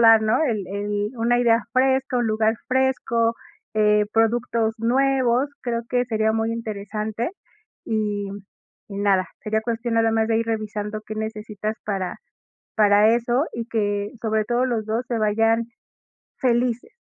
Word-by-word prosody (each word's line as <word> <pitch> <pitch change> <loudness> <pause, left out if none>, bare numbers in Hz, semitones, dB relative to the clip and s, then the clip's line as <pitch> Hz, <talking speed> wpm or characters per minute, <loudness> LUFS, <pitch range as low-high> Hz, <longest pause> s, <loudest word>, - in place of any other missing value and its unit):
dar, 225 -1 +7
¿no? 220 +7 +2
El 215 -9 -1
el 205 +1 -2
una 240 +1 +2
idea 235 -1 +3
fresco, 260 0 +2
un 240 - +1
lugar 220 0 +2
fresco, 250 -3 +1 0.4
eh, 210 -1 +3
productos 225 0 +1
nuevos. 260 +2 +2
Creo 235 -1 -2
que 245 0 +1
sería 220 -1 +1
muy 225 +1 0
interesante, 215 +2 -4 0.5
y 210 -2 -1 0.6
y 200 -1 -6
nada. 195 -2 +2
Sería 220 +1 -1
cuestión 235 0 -2
nada 225 0 +3
más 220 0 +1
de 225 - +2
ir 230 - -1
revisando 215 -1 -3
qué 215 - -5
necesitas 215 -1 -4
para 195 -3 -2 0.6
para 210 +1 +5
eso 240 +4 +1
y 235 -1 -4
que, 205 -3 -1
sobre 220 -1 0
todo, 240 +2 +1
los 230 -4 -1
2 225 +3 -2
se 235 - -1
vayan 225 +2 +2 0.7
felices. 245 - 0
225 Hz, 150 wpm, -23 LUFS, 215-235 Hz, 0.7 s, dar